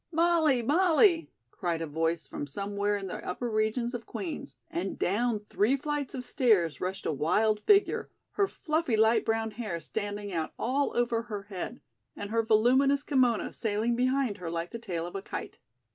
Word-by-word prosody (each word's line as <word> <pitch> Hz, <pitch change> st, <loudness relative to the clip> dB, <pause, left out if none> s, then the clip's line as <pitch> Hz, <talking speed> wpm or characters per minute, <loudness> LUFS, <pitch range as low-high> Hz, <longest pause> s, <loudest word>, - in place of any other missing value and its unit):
"Molly! 325 Hz, -6 st, +3 dB
Molly!" 335 Hz, -, +4 dB, 0.2 s
cried 170 Hz, -2 st, -2 dB
a 165 Hz, -, -2 dB
voice 160 Hz, +2 st, -1 dB
from 145 Hz, -, -5 dB
somewhere 200 Hz, +6 st, -1 dB
in 195 Hz, -, -6 dB
the 185 Hz, -, -6 dB
upper 210 Hz, +7 st, -3 dB
regions 220 Hz, +2 st, 0 dB
of 240 Hz, -1 st, -6 dB
Queen's, 185 Hz, -, -6 dB
and 185 Hz, +3 st, -3 dB
down 215 Hz, +3 st, +1 dB
three 230 Hz, +7 st, +2 dB
flights 290 Hz, -1 st, -3 dB
of 255 Hz, -, -4 dB
stairs 215 Hz, -, +2 dB
rushed 185 Hz, +1 st, -3 dB
a -, -, +1 dB
wild 195 Hz, +9 st, +2 dB
figure, 405 Hz, -1 st, +4 dB, 0.2 s
her 400 Hz, -1 st, +1 dB
fluffy 310 Hz, -10 st, -1 dB
light 220 Hz, +1 st, +4 dB
brown 225 Hz, 0 st, 0 dB
hair 210 Hz, -6 st, -4 dB
standing 205 Hz, +1 st, -4 dB
out 160 Hz, -2 st, -2 dB
all 270 Hz, +3 st, 0 dB
over 240 Hz, -1 st, +1 dB
her 210 Hz, -4 st, -6 dB
head 195 Hz, -3 st, -6 dB, 0.3 s
and 205 Hz, 0 st, -6 dB
her 230 Hz, 0 st, +3 dB
voluminous 255 Hz, +6 st, +3 dB
kimono 255 Hz, -6 st, +2 dB
sailing 220 Hz, +2 st, 0 dB
behind 255 Hz, -3 st, +1 dB
her 175 Hz, -2 st, -4 dB
like 170 Hz, +1 st, -3 dB
the 235 Hz, -, -5 dB
tail 175 Hz, -7 st, -4 dB
of 175 Hz, -, -7 dB
a 195 Hz, -, -3 dB
kite. -, -, -7 dB
220 Hz, 175 wpm, -29 LUFS, 195-255 Hz, 0.3 s, Molly